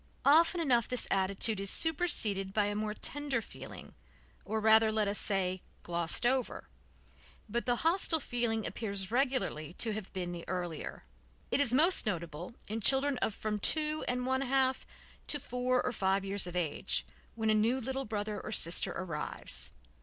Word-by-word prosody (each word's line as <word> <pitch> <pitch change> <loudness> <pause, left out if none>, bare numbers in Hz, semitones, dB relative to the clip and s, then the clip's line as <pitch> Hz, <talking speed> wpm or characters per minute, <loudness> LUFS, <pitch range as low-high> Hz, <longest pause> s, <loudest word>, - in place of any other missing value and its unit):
Often 330 +4 +5
enough 245 -7 +2
this 250 -2 -1
attitude 195 +2 +1
is 195 0 +1
superseded 220 - +2
by 210 -1 +3
a 205 - -1
more 210 0 -2
tender 285 -1 -1
feeling, 225 - -10 0.5
or 220 +2 -2
rather 220 0 +5
let 215 -1 +1
us 200 0 0
say 185 -2 -1 0.2
glossed 170 +5 -1
over, 255 +1 0 0.8
but 235 +4 -3
the 245 - +3
hostile 330 -1 +3
feeling 235 -5 -1
appears 200 -3 -4
regularly 250 - 0
to 225 -2 0
have 210 -2 -6
been 180 -2 -4
the 170 -1 -6
earlier. 175 -4 -4 0.5
It - - +2
is 275 -5 +3
most 310 +1 +4
noticeable 170 +1 -4
in 220 +2 -3
children 270 +3 +3
of 220 - -1
from 210 -1 -3
two 305 +6 +1
and 250 0 -1
one 260 +1 +1
half 265 0 +1 0.4
to 290 - -1
four 250 0 0
or - - 0
five 195 -3 0
years 195 -1 0
of 175 - -7
age, 170 -5 -1 0.3
when 220 -1 +1
a - - +4
new 225 +5 +2
little 265 +2 -3
brother 210 -1 -3
or - - -6
sister 170 -4 +2
arrives. 165 -5 -4
220 Hz, 170 wpm, -32 LUFS, 195-260 Hz, 0.8 s, Often